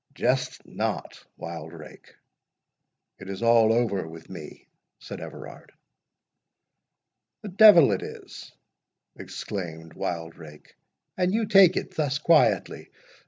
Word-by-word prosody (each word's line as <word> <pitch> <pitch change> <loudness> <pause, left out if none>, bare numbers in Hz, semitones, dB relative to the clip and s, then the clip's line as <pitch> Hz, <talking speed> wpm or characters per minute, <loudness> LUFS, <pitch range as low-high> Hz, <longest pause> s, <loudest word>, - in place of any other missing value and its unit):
"Jest 125 0 -1
not, - - -5
Wildrake—it 85 +3 -14
is 100 +3 -6
all 115 -1 +4
over 115 -7 0
with 80 +2 -12
me," 80 -5 -11 0.3
said - - -10
Everard. - - -11 1.7
"The 210 - -6
devil 185 - +7
it 95 - -1
is," - - -10 0.6
exclaimed 80 -5 -7
Wildrake, 80 -3 -7 0.4
"and 180 0 +1
you 220 +2 0
take 195 -4 +5
it - - -4
thus 145 -2 0
quietly! 160 +1 +1
110 Hz, 100 wpm, -25 LUFS, -, 1.7 s, devil